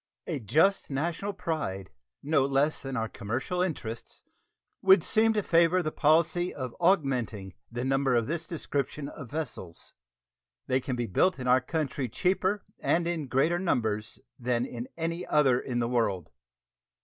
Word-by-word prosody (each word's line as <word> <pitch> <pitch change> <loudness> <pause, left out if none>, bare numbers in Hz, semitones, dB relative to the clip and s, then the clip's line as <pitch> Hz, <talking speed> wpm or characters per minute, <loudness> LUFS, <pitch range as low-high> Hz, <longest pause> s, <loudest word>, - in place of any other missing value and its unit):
A 160 -5 -3
just 155 - +2
national 165 +8 -2
pride, 100 - -3 0.3
no 145 -1 +3
less 140 +3 +1
than 135 -1 -4
our 110 0 -1
commercial 120 - -3
interests, 120 -11 -4 0.6
would 190 -3 +6
Seem 225 +1 +3
to 210 -2 0
favor 170 +1 +4
the 155 - -2
policy 165 +4 +2
of 130 -3 -6
augmenting 130 - +1 0.2
the 120 +2 -3
number 135 -1 +2
of 115 -1 +2
this 165 +4 -3
description 145 -2 -3
of 135 -7 -9
vessels. 135 - -6 0.7
They 130 - +1
can 130 0 -3
be 120 -1 -1
built 160 - +2
in 125 -2 -5
our 125 +1 +5
country 140 -4 -2
cheaper 190 - 0
and 170 0 +1
in 165 -4 -2
greater 150 +7 +2
numbers 110 - -1 0.2
than 120 0 0
in 120 -1 -6
any 165 +2 -2
other 135 -5 +4
in 125 -2 -4
the 120 -1 +1
world. 100 -9 0
140 Hz, 155 wpm, -28 LUFS, 120-170 Hz, 0.7 s, would